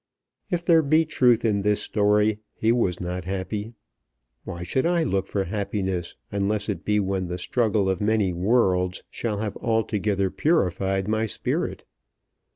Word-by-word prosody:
If 175 -3 -2
there 165 -1 +6
be 155 +2 +3
truth 125 -6 +3
in 105 -3 +2
this 105 +1 +2
story, 105 0 +2 0.2
He 110 - +2
was 95 -8 +1
not 90 0 -4
happy. 100 +4 -4 0.7
Why 85 0 -6
should 130 - 0
I 170 -1 +2
look 95 -9 -1
for 100 - -1
happiness, 95 -2 -3 0.2
unless 100 +1 -1
it 95 -3 -3
be 105 0 +2
when 95 -2 -1
the 90 +1 -4
struggle 105 +1 +1
of 95 0 0
many 105 -3 +2
worlds 90 -2 +1
shall 110 -3 -2
have 105 -2 -3
altogether 105 -4 0
purified 95 - +1
my 110 +1 0
spirit? - - -2
105 Hz, 155 wpm, -25 LUFS, 95-110 Hz, 0.7 s, there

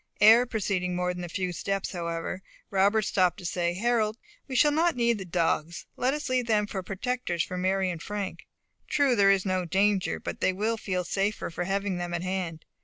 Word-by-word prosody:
Ere 225 +4 +7
proceeding 190 -5 -1
more 180 0 0
than 180 0 -6
a 175 - -5
few 185 +1 -2
steps, 195 +3 -2
however, 170 +1 -4 0.3
Robert 200 +3 +3
stopped 185 -3 +2
to 180 - -10
say, 175 0 -1
"Harold, 220 +1 +1 0.3
we 265 - -5
shall 295 +4 +5
not 325 +2 +2
need 235 -2 +2
the 190 - -6
dogs. 170 -1 -1
Let 260 +3 +1
us 295 -1 -4
leave 255 -2 0
them 210 -2 +2
for 200 -2 -4
protectors 195 -2 -2
to 185 - -6
Mary 190 0 +1
and 165 -2 -6
Frank. 205 -1 -5 0.4
True, 285 -4 +3
there 200 -2 +5
is 195 -1 +3
no 185 -1 0
danger; 195 +2 +1
but - - -6
they 190 - +2
will 215 +4 0
feel 185 -4 -2
safer 195 +2 -1
for 175 +2 -3
having 195 0 -1
them 175 0 -3
at 175 - -3
hand. 185 -4 -3
195 Hz, 205 wpm, -27 LUFS, 180-220 Hz, 0.4 s, Ere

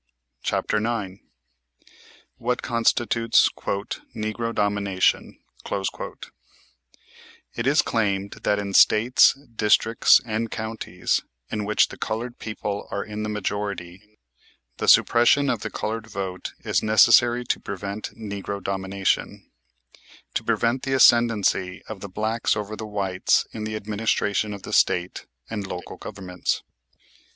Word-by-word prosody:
CHAPTER - - 0
IX 105 -4 -3 1.2
WHAT 125 +1 -2
CONSTITUTES 115 -1 +2 0.6
"NEGRO 110 +1 -3
DOMINATION" 100 -3 0 2.2
It 120 +2 -2
is 145 +3 +4
claimed 100 -3 -1
that 105 - +1
in 100 -1 -4
States, 115 +7 +5 0.2
districts, 110 +1 +4
and 115 0 -2
counties, 110 0 -2 0.3
in 105 -1 -2
which 105 +1 +3
the - - -11
colored 120 +3 -4
people 105 -2 -4
are 100 - -3
in 105 0 -6
the 110 - -3
majority, 105 -1 -5 0.6
the - - -3
suppression 130 +4 +5
of 115 - -2
the - - -4
colored 110 +1 -4
vote 95 -4 -5
is - - +1
necessary 120 +3 +5
to - - 0
prevent 100 +2 -5
"Negro 100 -2 -5
Domination," 95 0 -2 0.8
to - - -1
prevent 120 +2 +1
the 135 - -2
ascendency 110 -7 +3
of 110 -3 -7
the 100 - -8
blacks 110 +4 0
over 105 0 -4
the 110 0 -7
whites 95 -3 +1
in 110 -1 -5
the 110 0 -4
administration 105 0 -1
of 100 -2 -8
the - - -7
State 90 +1 +1 0.2
and 105 -3 -4
local 90 -2 -7
governments. 90 -3 -4
105 Hz, 120 wpm, -24 LUFS, 100-115 Hz, 2.2 s, States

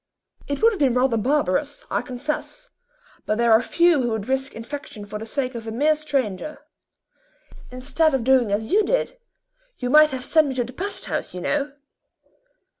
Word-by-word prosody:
"It 285 +8 -3
would 455 - +7
have 405 - -6
been 265 -4 +3
rather 250 -1 +2
barbarous, 280 +2 0
I - - +1
confess, 300 - -5 0.6
but 215 - +1
there 235 -1 +4
are 220 - +6
few 340 0 +3
who 240 - 0
would 220 -2 -3
risk 265 +1 -1
infection 230 -3 -7
for 210 +1 -6
the 220 - -7
sake 255 +1 -2
of 230 -1 -7
a - - -3
mere 290 +7 +3
stranger. 290 -3 -2 1.1
Instead 270 +4 +1
of 260 - -1
doing 255 -4 +3
as 220 +6 -1
you 420 +3 +4
did, - - -1 0.6
you 250 -1 -3
might 305 +1 +7
have 260 -2 -5
sent 315 -2 +4
me 265 - -3
to 250 - +1
the 245 +2 -10
pest 395 +8 -4
house, - - -4
you 180 - -5
know." 285 +8 -1
265 Hz, 190 wpm, -23 LUFS, 230-300 Hz, 1.1 s, would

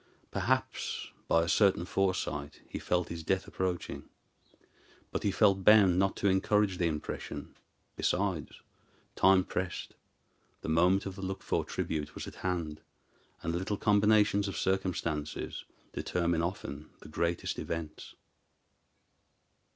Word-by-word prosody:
Perhaps - - -1 0.2
by 85 - +4
a - - -2
certain 95 0 +3
foresight 90 -7 -1
he - - -5
felt 90 -1 0
his 85 -1 -5
death 95 +4 0
approaching; 90 -2 -3 1.0
but - - -2
he - - +1
felt 100 -1 +3
bound 100 -3 +7
not 95 0 +2
to 100 - 0
encourage 95 0 +2
the 85 - +3
impression. 75 -2 -5 0.4
Besides, 90 -5 -1 0.5
time 95 -1 +5
pressed; 90 0 -4 0.7
the - - -4
moment 90 +5 +4
of 95 -2 -5
the 95 - -8
looked 95 0 -4
for - - 0
tribute 75 -2 -3
was - - -5
at - - -8
hand, 85 -5 -2 0.6
and 85 - -1
little 95 +4 -1
combinations 105 -1 +4
of 95 - -4
circumstances 85 -6 -2 0.3
determine 85 -2 0
often 80 -4 -4
the - - -11
greatest 85 +2 -1
events. 80 -2 -5
90 Hz, 130 wpm, -31 LUFS, 85-95 Hz, 1.0 s, bound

